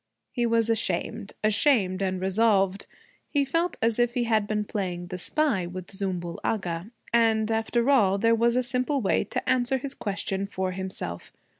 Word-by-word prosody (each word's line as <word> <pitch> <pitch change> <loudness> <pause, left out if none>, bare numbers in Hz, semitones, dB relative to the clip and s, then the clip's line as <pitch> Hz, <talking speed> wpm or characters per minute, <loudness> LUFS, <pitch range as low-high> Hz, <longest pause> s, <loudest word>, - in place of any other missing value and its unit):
He 240 -1 0
was 230 -1 +2
ashamed 220 0 -1
ashamed 205 -3 +3
and 190 -1 -1
resolved. 195 0 +2 0.4
He 285 -2 +1
felt 330 +6 -1
as 230 0 +2
if 240 +1 +2
he 245 - +1
had 220 -3 +1
been 210 0 0
playing 180 -4 -3
the 185 0 -5
spy 245 - 0
with 185 +2 -7
Zümbül 180 -3 -3
Agha. 180 -3 -2 0.2
And 225 -1 +3
after 225 +2 0
all, 210 -9 +4
there 230 +3 +3
was 235 +1 +3
a 255 - +2
simple 255 +3 0
way 205 - +1
to - - -4
answer 255 +1 +2
his 270 +1 -5
question 195 -3 -3
for 190 -1 -2
himself. 185 - -5
215 Hz, 170 wpm, -26 LUFS, 190-240 Hz, 0.4 s, all